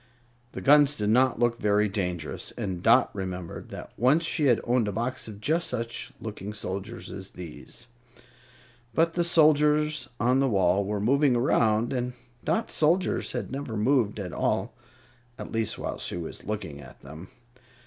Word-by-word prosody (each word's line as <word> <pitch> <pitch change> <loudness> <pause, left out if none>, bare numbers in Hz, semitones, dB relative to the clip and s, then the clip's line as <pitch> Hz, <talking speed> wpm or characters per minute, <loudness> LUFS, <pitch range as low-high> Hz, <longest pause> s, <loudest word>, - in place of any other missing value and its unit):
The - - -6
guns 145 0 +5
did 105 0 0
not 130 +2 +3
look 120 -1 +1
very 105 0 +2
dangerous, 90 -5 -3
and 90 -2 -3
Dot - - +5
remembered 90 -3 -6
that - - -9
once 145 +7 +3
she 160 -2 0
had 120 -4 +4
owned 120 -2 +1
a - - -1
box 120 +5 -3
of 105 -2 -9
just 160 +9 0
such 115 -1 -4
looking 105 -2 -6
soldiers 100 +3 -6
as 95 0 -7
these. 90 +7 -9 1.1
But 165 +1 +3
the 175 - +1
soldiers 150 -3 +3
on 125 +3 +3
the 135 -1 +2
wall 95 -1 +2
were 105 +1 -2
moving 135 +5 +3
around, 115 -1 +2
and 125 -1 -2 0.3
Dot's 225 - -1
soldiers 170 +5 +1
had - - -4
never 135 -5 -4
moved 110 -2 +2
at 90 -3 -5
all - - -1 0.6
at - - -8
least, 115 -1 -1
while - - -4
she - - -1
was 85 - -7
looking 95 -9 -5
at - - -14
them. 80 +6 -10
115 Hz, 165 wpm, -27 LUFS, 100-140 Hz, 1.1 s, guns